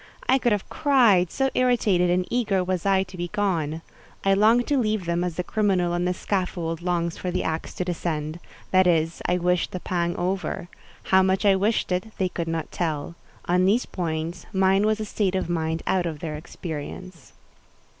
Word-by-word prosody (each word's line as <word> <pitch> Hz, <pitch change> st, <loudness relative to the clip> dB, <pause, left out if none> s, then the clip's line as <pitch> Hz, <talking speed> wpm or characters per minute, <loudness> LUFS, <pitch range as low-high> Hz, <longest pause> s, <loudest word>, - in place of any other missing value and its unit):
I 265 Hz, +1 st, +4 dB
could 240 Hz, -, +1 dB
have 205 Hz, -2 st, 0 dB
cried, 235 Hz, -, +4 dB
so 270 Hz, +6 st, 0 dB
irritated 215 Hz, -8 st, +2 dB
and 180 Hz, +1 st, +2 dB
eager 210 Hz, -6 st, +1 dB
was 185 Hz, 0 st, -2 dB
I 190 Hz, -1 st, +4 dB
to 190 Hz, 0 st, -12 dB
be 175 Hz, 0 st, -3 dB
gone. 165 Hz, -5 st, -1 dB, 0.4 s
I 195 Hz, -, +5 dB
longed 225 Hz, +5 st, +4 dB
to 285 Hz, -2 st, +3 dB
leave 215 Hz, -5 st, 0 dB
them 170 Hz, +1 st, 0 dB
as 180 Hz, -2 st, -3 dB
the 180 Hz, -, -2 dB
criminal 185 Hz, -3 st, +1 dB
on 175 Hz, +1 st, 0 dB
the 180 Hz, -, +1 dB
scaffold 175 Hz, -4 st, -2 dB
longs 170 Hz, -1 st, -1 dB
for 180 Hz, -, -3 dB
the -, -, -1 dB
axe 160 Hz, 0 st, -3 dB
to 180 Hz, -, -2 dB
descend: 160 Hz, -2 st, -3 dB, 0.3 s
that 185 Hz, -1 st, +5 dB
is, 165 Hz, -1 st, +1 dB
I 180 Hz, -, +2 dB
wished 180 Hz, 0 st, +1 dB
the 185 Hz, -, -5 dB
pang 175 Hz, -1 st, -1 dB
over. 180 Hz, -1 st, -2 dB, 0.3 s
How 190 Hz, 0 st, +4 dB
much 190 Hz, +1 st, +1 dB
I 195 Hz, -1 st, +6 dB
wished 205 Hz, +1 st, 0 dB
it, 185 Hz, +5 st, -2 dB
they 185 Hz, -1 st, 0 dB
could 170 Hz, -2 st, -4 dB
not 165 Hz, -1 st, -3 dB
tell. 160 Hz, -2 st, -2 dB, 0.3 s
On 180 Hz, +1 st, +2 dB
these 215 Hz, +6 st, +3 dB
points, 165 Hz, 0 st, -4 dB
mine 195 Hz, +1 st, +3 dB
was 215 Hz, 0 st, +1 dB
a 215 Hz, -, -3 dB
state 200 Hz, -3 st, -1 dB
of 185 Hz, -2 st, -1 dB
mind 160 Hz, -1 st, -1 dB
out 180 Hz, -2 st, +1 dB
of 160 Hz, -2 st, -4 dB
their 155 Hz, -1 st, -4 dB
experience. 165 Hz, +1 st, -8 dB
180 Hz, 195 wpm, -24 LUFS, 170-195 Hz, 0.4 s, I